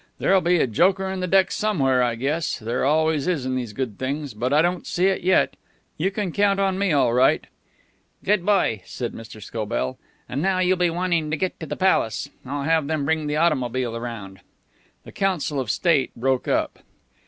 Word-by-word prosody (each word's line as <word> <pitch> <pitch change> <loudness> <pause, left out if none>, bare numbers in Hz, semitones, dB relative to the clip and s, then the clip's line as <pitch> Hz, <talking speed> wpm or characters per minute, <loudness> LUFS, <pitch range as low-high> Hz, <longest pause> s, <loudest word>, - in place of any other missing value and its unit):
There'll 190 -1 +3
be 175 +1 +3
a - - +3
joker 185 - +2
in 190 0 -3
the 185 - -2
deck 190 +1 +3
somewhere, 135 -12 +1
I 120 -2 +1
guess. 145 +7 -1
There 115 +2 -2
always 155 +1 +2
is 160 -8 0
in 130 0 -1
these 125 -4 -3
good 115 -2 -4
things. 140 0 -3
But 120 +5 -2
I 150 +2 +4
don't 175 +1 -1
see 180 - 0
it 190 0 +2
yet. 185 +1 +2 0.4
You 180 +5 0
can 200 -2 -3
count 200 +2 +2 0.2
me 200 0 0
in 155 - +2
all 130 -4 +3
right." 125 +2 +3 0.8
"Good 205 -2 +2
boy," 185 - +2
said 120 -2 -5
Mr. 110 -1 -10
Scobell. 105 - -3 0.3
"And 140 - -3
now 190 +1 +1
you'll 185 0 +3
be 175 -1 +2
wanting 170 -2 0
to 155 - -1
get 185 +3 -2
to 160 - -6
the - - -4
Palace. 140 - +1 0.2
I'll 145 -1 -3
have 160 -1 +1
them 155 -2 -1
bring 155 0 0
the 150 0 -1
automobile 130 -7 0
round." 105 -6 -7 0.6
The - - -12
council 175 -7 -1
of 125 -5 -3
state 135 - +2
broke 130 +1 0
up. - - 0
150 Hz, 200 wpm, -23 LUFS, 125-180 Hz, 0.8 s, I